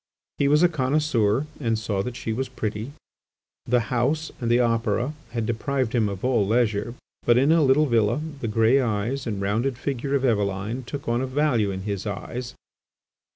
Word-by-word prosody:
He 140 Hz, -, +3 dB
was 150 Hz, +4 st, +4 dB
a -, -, +8 dB
connoisseur 135 Hz, -5 st, +1 dB
and 115 Hz, -5 st, 0 dB
saw 105 Hz, -3 st, -1 dB
that 125 Hz, +4 st, -5 dB
she 110 Hz, -, -3 dB
was 130 Hz, +3 st, -3 dB
pretty. 110 Hz, +1 st, -4 dB, 0.7 s
The 125 Hz, 0 st, +3 dB
House 145 Hz, +7 st, 0 dB
and 120 Hz, -, -1 dB
the 120 Hz, +1 st, +4 dB
Opera 115 Hz, +2 st, +1 dB, 0.2 s
had 115 Hz, -2 st, -2 dB
deprived 125 Hz, +2 st, -1 dB
him 110 Hz, -4 st, +2 dB
of 100 Hz, +3 st, -5 dB
all 125 Hz, -5 st, +3 dB
leisure, 110 Hz, 0 st, +1 dB, 0.3 s
but, 120 Hz, 0 st, +4 dB
in 135 Hz, +5 st, +4 dB
a 165 Hz, 0 st, +5 dB
little 145 Hz, +2 st, +4 dB
villa, 115 Hz, -1 st, +2 dB, 0.2 s
the 115 Hz, -, -3 dB
grey 115 Hz, +5 st, +3 dB
eyes 120 Hz, +3 st, -2 dB
and 105 Hz, -3 st, -2 dB
rounded 115 Hz, +6 st, 0 dB
figure 135 Hz, +1 st, -2 dB
of 135 Hz, -1 st, +1 dB
Eveline 105 Hz, +2 st, -1 dB
took 140 Hz, +2 st, -6 dB
on 120 Hz, +1 st, +1 dB
a 130 Hz, -, -1 dB
value 130 Hz, -6 st, +1 dB
in 95 Hz, -1 st, -4 dB
his 100 Hz, 0 st, -3 dB
eyes. 120 Hz, +5 st, -5 dB
120 Hz, 185 wpm, -24 LUFS, 110-135 Hz, 0.7 s, a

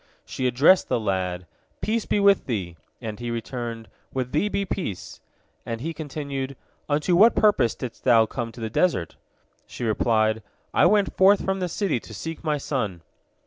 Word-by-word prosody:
She 130 Hz, -, -2 dB
addressed 140 Hz, +10 st, +5 dB
the -, -, +1 dB
lad, 95 Hz, -4 st, -2 dB, 0.3 s
"Peace 225 Hz, 0 st, -1 dB
be -, -, +1 dB
with 200 Hz, -1 st, +4 dB
thee!" 95 Hz, -9 st, -3 dB, 0.3 s
and 110 Hz, -2 st, -6 dB
he 120 Hz, 0 st, -4 dB
returned, 115 Hz, -1 st, -5 dB, 0.2 s
"With 130 Hz, -1 st, -3 dB
thee 200 Hz, +8 st, +1 dB
be 200 Hz, -1 st, -1 dB
peace!" 135 Hz, -, -5 dB, 0.4 s
and 115 Hz, -1 st, -4 dB
he 165 Hz, +7 st, -4 dB
continued, 140 Hz, -3 st, -5 dB, 0.3 s
"Unto 150 Hz, +4 st, +2 dB
what 220 Hz, +6 st, +6 dB
purpose 175 Hz, -, +3 dB
didst 125 Hz, -3 st, -7 dB
thou 115 Hz, -3 st, +5 dB
come 115 Hz, 0 st, -4 dB
to -, -, -12 dB
the 110 Hz, -1 st, -4 dB
desert?" 115 Hz, -, +1 dB, 0.5 s
She -, -, -7 dB
replied, 110 Hz, 0 st, +1 dB, 0.3 s
"I -, -, +5 dB
went 205 Hz, -2 st, +2 dB
forth 195 Hz, +1 st, +5 dB
from 190 Hz, 0 st, 0 dB
the 180 Hz, -1 st, -2 dB
city 180 Hz, -, 0 dB
to 110 Hz, -, -11 dB
seek 160 Hz, -, -6 dB
my 155 Hz, -2 st, 0 dB
son." 110 Hz, -, -3 dB
130 Hz, 175 wpm, -24 LUFS, 110-175 Hz, 0.5 s, what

